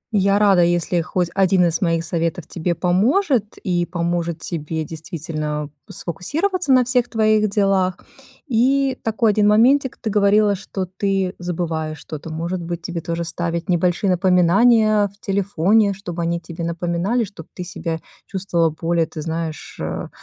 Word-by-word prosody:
Я 200 0 +3
рада, 200 -4 +5
если 175 0 +1
хоть 175 +1 -1
1 190 -2 +3
из 165 +1 0
моих 165 -2 +1
советов 165 +1 -2
тебе 175 0 -2
поможет, 215 - +1
и 175 -2 +1
поможет 170 -1 -2
тебе 160 -1 -3
действительно 155 -2 -5 0.2
сфокусироваться 295 - -2
на 255 -2 +5
всех 245 -1 +1
твоих 215 -2 +2
делах. 195 -3 +1 0.5
И 265 +2 +2
такой 225 0 +2
один 205 0 +3
моментик: 255 +5 +4
ты 215 - -3
говорила, 205 0 +4
что 190 -1 -4
ты 190 0 -1
забываешь 160 -3 -3
что-то. 155 +1 -8
Может 170 +3 -3
быть, 170 0 -5
тебе 170 -1 -4
тоже 170 0 -3
ставить 170 +1 -3
небольшие 180 +2 +2
напоминания 205 +4 +4
в 200 +1 -21
телефоне, 200 +1 +2
чтобы 175 -3 -6
они 170 0 -1
тебе 170 0 -7
напоминали, 175 +7 -1
чтоб 190 -6 -10
ты 180 - -7
себя 165 -2 -4 0.3
чувствовала 180 -4 0
более, 165 +1 0
ты 160 - -9
знаешь, 160 -1 -5
э, - - -4
180 Hz, 150 wpm, -21 LUFS, 170-205 Hz, 0.5 s, рада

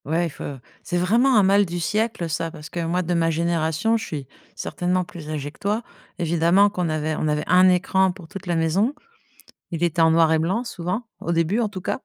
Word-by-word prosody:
Ouais 165 +4 +1
il - - -2
faut - - -9 0.4
c'est 175 - -2
vraiment 235 +9 +3
un 205 - +6
mal 200 +2 +5
du 175 -2 -4
siècle 210 0 -1
ça, 165 +1 -2
parce 150 -2 -11
que, 175 - -4
moi, 175 +2 0
de 175 +1 -1
ma 165 -1 +2
génération, 165 +5 +1
je 225 - -6
suis 145 -5 -6 0.3
certainement 180 +1 -1
plus 170 -5 -10
âgée 145 -2 -4
que - - -24
toi. 210 +4 -1 0.3
Évidemment 170 +3 +3
qu'on 180 -4 -2
avait 155 0 -1
on - - 0
avait 150 0 0
1 185 +1 +5
écran 190 +1 +2
pour 180 -2 -12
toute 195 +2 -9
la 175 - 0
maison. 185 - +1 0.8
Il 170 0 -2
était 170 -1 +1
en 160 0 +5
noir 165 -1 +4
et 160 - +4
blanc 185 +9 0
souvent, 190 -1 -4 0.2
au 170 - -2
début, 170 +6 +1
en 225 -3 0
tout 190 -2 -7
cas 220 - -3
175 Hz, 230 wpm, -23 LUFS, 160-195 Hz, 0.8 s, un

